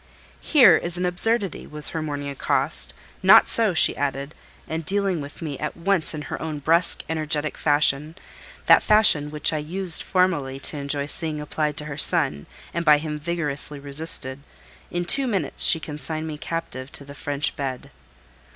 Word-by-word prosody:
"Here 290 -6 +5
is 175 0 -4
an 180 - -2
absurdity!" 195 +2 +1
was 150 -1 +1
her 160 - -5
morning 145 -2 -5
accost. 140 - -2 0.3
"Not - - +6
so," 220 -6 +1
she - - +5
added, 140 +1 -4 0.3
and 160 +1 -5
dealing 195 -1 -2
with 145 +4 -10
me 145 -4 -6
at - - -5
once 175 -2 -1
in 150 - -7
her - - -7
own 155 -2 -5
brusque, 165 +4 +1
energetic 155 -1 -1
fashion—that 150 +2 0
fashion 200 -9 +4
which 150 +1 0
I 155 - -2
used 175 +3 +1
formerly 160 -8 -1
to 150 - -3
enjoy 140 0 -4
seeing 155 +1 -3
applied 150 0 -3
to 150 - -4
her 145 -2 -7
son, 140 - +3 0.3
and 170 - -3
by 150 -2 +5
him 150 0 -6
vigorously 150 -3 -2
resisted—in 140 +3 0
two 270 +8 +3
minutes 190 - -1
she 165 - +5
consigned 155 +1 -6
me 155 -2 -7
captive 145 -6 -6
to 140 - -7
the 140 - -11
French 145 0 -2
bed. 130 -3 -6
155 Hz, 165 wpm, -22 LUFS, 145-170 Hz, 0.3 s, Not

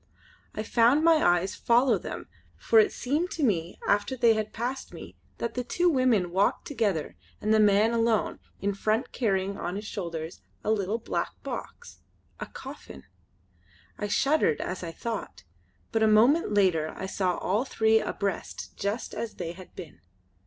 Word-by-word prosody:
I 215 - -2
found 240 +7 +3
my 330 -1 +6
eyes 175 +2 +2
follow 245 +3 +3
them, - - -7 0.3
for 455 - +4
it 425 -3 +4
seemed 300 +8 -1
to 315 - -3
me 175 -8 0
after 205 +6 +1
they 235 -2 +5
had 215 -1 -2
passed 245 +4 -4
me - - -10 0.2
that 235 -1 -3
the 250 - -2
two 350 +8 +1
women 245 - +2
walked 190 +3 +1
together 205 - -1 0.2
and 215 +1 +1
the 220 - +5
man 210 +1 +4
alone 230 -2 +1 0.2
in 200 0 -1
front 215 +4 -1
carrying 195 -4 -1
on 175 - -3
his 210 +2 -5
shoulder 170 -6 -4 0.4
a 215 - +1
little 210 0 0
black 235 - -3
box - - -7 0.4
a - - -5
coffin. 65 - -10 1.0
I 205 - -2
shuddered 270 - +2
as 185 - -4
I 170 -2 -5
thought, 195 - -6 0.5
but 225 - 0
a 220 - +5
moment 235 +8 +4
later 180 -6 +2
I 190 - -4
saw 190 -1 -1
all 205 +6 0
three 220 -4 +3
abreast 200 -3 -4
just 205 +4 -3
as 230 - -5
they 170 -2 -4
had 185 +1 -13
been. 170 -6 -10
215 Hz, 165 wpm, -27 LUFS, 190-235 Hz, 1.0 s, my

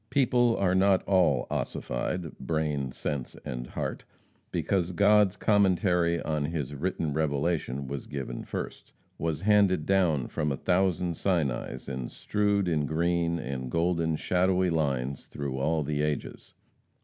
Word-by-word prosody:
People 120 -3 +3
are 90 -2 +2
not 95 0 +4
all 85 -10 +3
ossified 80 +7 -3
brain, 75 -4 -1
sense 70 -1 -4
and - - -4
heart, - - -4 0.5
because 90 -2 0
God's 105 +1 +4
Commentary 90 -4 +3
on 75 -2 -1
his 75 -3 -3
written 80 0 -2
Revelation 70 -2 -1
was 70 0 -5
given 65 -3 -5
first - - -6 0.3
was 80 -2 -2
handed 100 -5 +3
down 85 -9 +2
from 75 -1 -1
a 70 - -2
thousand 90 0 +1
Sinais, 80 -10 -1
and 65 -2 -4
strewed 105 -2 0
in 75 -4 +1
green, 85 +1 +1
and 65 -4 -4
golden 85 0 +1
shadowy 90 +2 +1
lines 70 -4 -1
through 70 -2 -4
all 80 +3 +1
the 75 +1 -1
ages. 75 -1 -4
80 Hz, 135 wpm, -28 LUFS, 70-95 Hz, 0.5 s, not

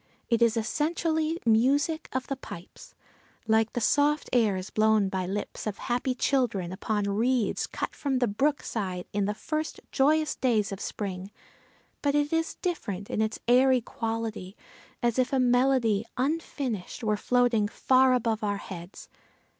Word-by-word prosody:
It 230 -1 +2
is 230 -1 +4
essentially 320 +6 0
music 275 +8 +2
of 260 0 -2
the 275 - -3
pipes, 180 -8 -11 0.5
like 220 0 +2
the - - -1
soft 290 +5 +2
airs 205 -6 +1
blown 215 -2 +3
by 185 -1 -2
lips 205 +3 -4
of 205 - -3
happy 250 +1 -1
children 240 -10 0
upon 205 +2 -1
reeds 220 +2 +1
cut - - -4
from 275 -3 -1
the 250 -1 +2
brook 280 +8 0
side 185 -5 -3
in 200 0 +1
the 210 +1 -1
first 310 +6 -3
joyous 305 +3 +2
days 220 -5 +1
of 195 - -5
spring, 190 -2 -5 0.7
but 285 -1 +1
it 295 +1 +1
is 325 0 0
different 205 - -3
in - - 0
its 220 0 -1
airy 255 +1 +5
quality, 225 -4 -4 0.5
as 240 +1 +1
if 255 0 +1
a 270 - +2
melody, 245 -4 +3
unfinished, 260 - -2
were 215 -1 +2
floating 235 -1 +2
far 255 +3 +3
above 225 -3 -1
our 205 -1 0
heads! 180 -2 -9
235 Hz, 155 wpm, -27 LUFS, 205-270 Hz, 0.7 s, airy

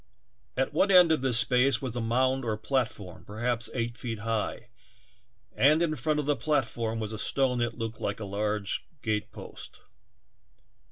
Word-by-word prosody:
At 135 +2 0
one 190 +6 +3
end 180 -3 +7
of 160 - +2
this 130 -3 +3
space 125 +2 +3
was 130 -3 -5
a 120 - -1
mound 130 +3 +1
or 110 -3 -1
platform, 110 -6 -2
perhaps 120 +2 -2
eight 115 -1 -2
feet 115 -3 -4
high, 110 0 -3 0.9
and 150 +4 +5
in 155 -2 0
front 150 +3 0
of 150 - -2
the 145 0 +2
platform 115 -7 -1
was 110 0 -4
a 110 - -5
stone 130 +1 +1
that 120 -1 -1
looked 115 0 -5
like 100 -1 -2
a 105 - -5
large 105 +1 -2 0.2
gatepost. 110 -1 -5
120 Hz, 165 wpm, -28 LUFS, 110-135 Hz, 0.9 s, end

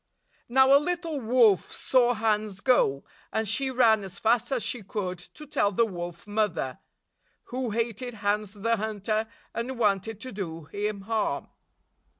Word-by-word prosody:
Now, 265 +2 +6
a 280 - +6
little 335 -3 -2
wolf 225 - +3
saw 245 -2 +2
Hans 215 -2 0
go, 140 - +3 0.3
and 220 0 -1
she 240 +6 +1
ran 230 -5 +4
as 190 -1 -8
fast 230 +3 +2
as 255 -4 0
she 245 - -1
could 185 -2 -4
to 300 +11 -12
tell 275 -8 +1
the 230 +4 +3
Wolf 175 -4 -6
Mother, 205 -11 -1 0.7
61 255 +2 -4
who 245 - -1
hated 230 +2 -2
Hans 205 -1 -1
the 230 +2 0
Hunter, 215 +1 -1 0.3
and 240 +3 -3
wanted 210 -1 +1
to 255 - -6
do 165 -5 -5
him 205 +5 -3
harm. 220 +1 -1
220 Hz, 155 wpm, -27 LUFS, 200-245 Hz, 0.7 s, Now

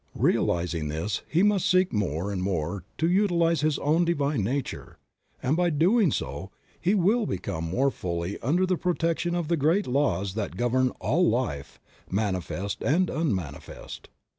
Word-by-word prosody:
Realizing 85 -3 +1
this, 80 +8 -2
he 170 +4 +3
must 205 -3 +3
seek 185 -2 +3
more 95 -2 -1
and 95 -2 -2
more 90 0 -2
to 160 - +1
utilize 170 -4 +2
his 155 -1 +1
own 160 +4 +2
Divine 145 - 0
nature, 130 +6 -4 0.5
and 135 +4 +2
by 175 +1 +2
so 155 - -2
doing 185 - +4 0.7
he 190 +4 +2
will 205 +4 +2
come 80 -1 -4
more 130 +12 +1
fully 85 -2 -4
under 170 +9 +1
the 185 -1 0
protection 175 0 0
of 170 -3 -1
the 170 +1 +1
great 165 +8 +2
laws 100 -9 0
that 105 -2 -4
govern 125 +2 +2
all 140 - +2
life, 80 - -2 0.3
manifest 100 0 -2
and 175 +5 +2
unmanifest. 100 - -4
140 Hz, 155 wpm, -26 LUFS, -, 0.7 s, doing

